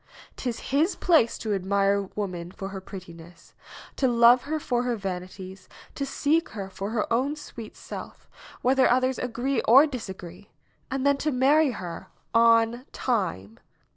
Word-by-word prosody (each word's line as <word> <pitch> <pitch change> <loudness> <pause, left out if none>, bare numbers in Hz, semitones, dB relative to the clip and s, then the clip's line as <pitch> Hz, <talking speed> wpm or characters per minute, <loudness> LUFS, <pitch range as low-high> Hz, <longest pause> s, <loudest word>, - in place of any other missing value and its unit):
'Tis 245 -3 -4
his 310 +7 +2
place 320 -10 +3
to 215 -2 -2
ad 195 -2 -2
mire 200 +1 +2
woman 180 -4 -4
for 195 +1 -7
her 195 -1 -7
prettiness; 170 -3 -12 0.4
to 265 - +1
love 240 +1 +5
her 310 +2 -2
for 245 -4 -1
her 245 -1 -1
vani 185 -3 -4
ties; 190 0 -10 0.2
to 275 - -3
seek 310 +4 +1
her 195 -3 -7
for 195 +2 -5
her 220 -2 -1
own 270 +5 +1
sweet 230 -7 -10
self, - - -9 0.4
whether 260 +1 +4
others 255 +1 +2
agree 250 +2 -1
or 265 +7 +8
disagree, 195 - -8 0.4
and 270 0 -2
then 280 0 +4
to 305 - -1
marry 280 +4 +4
her 185 -5 -6 0.3
on 230 +1 +4
time. 170 - -2
230 Hz, 160 wpm, -26 LUFS, 190-260 Hz, 0.4 s, or